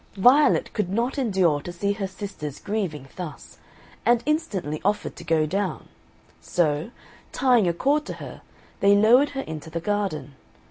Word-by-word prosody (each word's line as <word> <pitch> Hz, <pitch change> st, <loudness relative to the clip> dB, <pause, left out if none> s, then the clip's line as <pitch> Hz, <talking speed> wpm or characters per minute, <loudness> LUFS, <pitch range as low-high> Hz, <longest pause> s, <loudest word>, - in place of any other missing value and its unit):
Violet 255 Hz, +9 st, +4 dB
could 210 Hz, -5 st, -1 dB
not 235 Hz, +8 st, -1 dB
endure 185 Hz, -, +2 dB
to 175 Hz, -, -7 dB
see 200 Hz, +4 st, -1 dB
her 200 Hz, -2 st, -3 dB
sisters 190 Hz, -7 st, -7 dB
grieving 180 Hz, -10 st, -3 dB
thus, 175 Hz, -4 st, -8 dB, 0.4 s
and 240 Hz, -1 st, +3 dB
instantly 195 Hz, -, -1 dB
offered 205 Hz, +2 st, -1 dB
to -, -, -10 dB
go 160 Hz, -1 st, +2 dB
down; 195 Hz, +4 st, -3 dB, 0.5 s
so, 155 Hz, 0 st, 0 dB, 0.4 s
tying 245 Hz, -7 st, +3 dB
a 170 Hz, -, +2 dB
cord 290 Hz, -, +1 dB
to -, -, -4 dB
her, -, -, -9 dB, 0.4 s
they 200 Hz, 0 st, +5 dB
lowered 240 Hz, +8 st, +5 dB
her -, -, 0 dB
into 160 Hz, -, -7 dB
the 165 Hz, +1 st, -3 dB
garden. 195 Hz, -6 st, -2 dB
195 Hz, 155 wpm, -24 LUFS, 165-230 Hz, 0.5 s, they